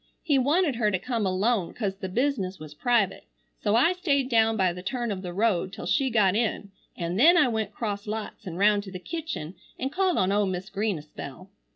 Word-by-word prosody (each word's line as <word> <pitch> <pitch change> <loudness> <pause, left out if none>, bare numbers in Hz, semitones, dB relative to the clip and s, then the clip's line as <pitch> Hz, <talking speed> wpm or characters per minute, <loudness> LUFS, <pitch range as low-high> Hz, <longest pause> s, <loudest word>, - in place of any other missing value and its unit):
He 285 -5 +3
wanted 290 0 +2
her 215 -3 +2
to 190 - +1
come 225 +1 -2
alone 190 +1 0
cause 195 -4 -2
the 190 -1 -5
business 205 -4 -1
was 155 -2 -10
private, 225 +3 +1 0.3
so 210 0 +1
I 295 +10 +4
stayed 280 -8 0
down 225 -2 +3
by 185 -3 +2
the 180 - -8
turn 240 +3 -2
of 190 -2 -4
the 180 -2 -5
road 190 -2 +1
till - - -7
she 275 -2 +2
got 205 -5 +3
in 215 -3 -1 0.3
an 170 +1 -2
then 330 +9 +7
I 300 - +5
went 220 -3 -2
cross 205 -1 -4
lots 215 -1 -5
an 170 -1 -5
round 205 +1 +4
to 190 - -8
the 185 - -5
kitchen 295 - -5 0.2
an 265 +1 -3
called 370 +2 +1
on 195 +1 +2
Mis' 185 +1 -5
Green 205 -1 -1
a 150 - -9
spell. 155 +5 -10
210 Hz, 220 wpm, -26 LUFS, 190-250 Hz, 0.3 s, then